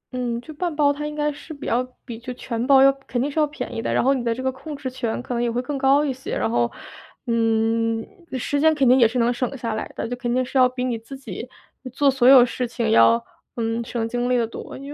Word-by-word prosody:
嗯， 240 -2 -2
就 310 - -11
半 340 +2 -3
包 285 -1 +3
它 295 +1 -4
应 300 - -6
该 295 0 0
是 295 +3 -11
比 280 - -9
较 245 +2 +1 0.2
比 235 -3 -7
就 250 +1 -7
全 240 0 -4
包 270 -1 +7
要 275 - +7 0.2
肯 245 - -2
定 285 +3 -1
是 315 - -1
要 300 - +3
便 300 - -6
宜 225 - -3
的， - - -2
然 - - +2
后 270 +2 +4
你 255 -3 -2
的 235 - 0
这 260 - -6
个 260 - +1
控 295 +3 -8
制 275 -2 -6
权 245 -3 -3
可 250 - -5
能 235 - -1
也 240 - +1
会 240 +1 -1
更 285 +3 -4
高 275 +2 +3
一 270 - -1
些。 260 +1 -5
然 110 - 0
后， 120 0 +1 0.5
嗯， 225 -1 +1 0.3
时 285 +4 -1
间 315 0 +4
肯 275 -4 +2
定 255 +2 +6
也 230 - +6
是 245 +3 -4
能 240 +1 +2
省 255 +2 -3
下 230 -2 -3
来 220 - -4
的， - - -3
就 245 - -3
肯 240 -1 -3
定 255 +1 +1
是 270 - -13
要 255 0 +6
比 250 0 -4
你 240 -3 -1
自 245 +4 -10
己， 245 -1 -8 0.3
呃， 255 - -8
做 275 +2 +2
所 255 -2 +2
有 260 -2 +9
事 250 0 -3
情 235 0 -2
要， 115 0 +5 0.3
嗯， 230 0 -2
省 230 -1 -3
精 245 +1 -2
力 250 - +3
得 235 - +2
多。 225 - -8
因 280 +2 -8
250 Hz, 305 characters per minute, -22 LUFS, 230-275 Hz, 0.5 s, 有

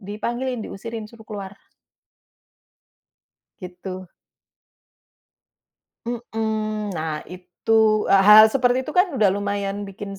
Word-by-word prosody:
dipanggilin, 235 +5 -4
diusirin 225 +2 -7
suruh 220 -1 -16
keluar. 200 -2 -7 2.1
Gitu. 185 +1 -8 2.0
Mmm, 220 -3 -3
nah 155 -3 -4
itu, 180 +3 -9 0.4
e - - +6
hal 215 +1 +9
seperti 250 +1 +1
itu 265 - -7
kan 360 0 +2
udah 215 -6 +3
lumayan 200 0 -3
bikin 195 0 -8
210 Hz, 95 wpm, -22 LUFS, 195-230 Hz, 2.1 s, hal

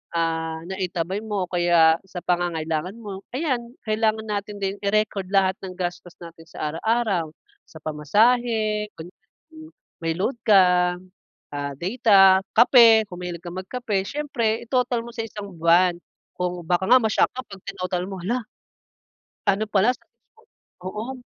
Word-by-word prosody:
ah, 160 -1 -1
naitabi 185 0 -3
mo 200 -4 -2
o - - -49
kaya 170 -2 +4
sa 180 -1 -7
pangangailangan 175 +1 -1
mo. 200 -2 -8
Ayan, 250 -5 -2
kailangan 220 0 0
natin 205 0 -4
din 195 0 -1
i-record 205 -1 0
lahat 190 -1 +3
ng 185 - -7
gastos 175 -1 -5
natin 165 -1 -12
sa 155 -2 -4
araw-araw, 200 -5 0 0.4
sa 160 - -13
pamasahe, 215 - +1
kunya 170 +3 -10 0.4
mm. 315 0 -12 0.3
May 165 0 0
load 240 +6 -1
ka, 180 -3 +5 0.6
ah, 145 -1 -3
data, 195 -2 +5 0.2
kape, 230 -2 +7
kung 180 0 -9
mahilig 175 -1 -6
kang 175 0 -7
magkape. 205 -1 -2
Siyempre, 240 -7 -1
i-total 245 -1 0
mo 235 - -9
sa 225 - -3
isang 200 -3 -9
buwan 170 +1 +4 0.4
kung 180 -1 -3
baka 180 +1 +1
nga 255 +1 +8
ma-shock 220 - +2
ka 255 - -3
'pag 195 -2 -11
tinotal 180 0 -3
mo, 190 -2 -6
hala 235 +2 -2 1.0
ano 200 +2 +2
pala 215 +6 +3
sa - - -29 0.8
oo. 225 +7 -5
195 Hz, 145 wpm, -23 LUFS, 175-220 Hz, 1.0 s, nga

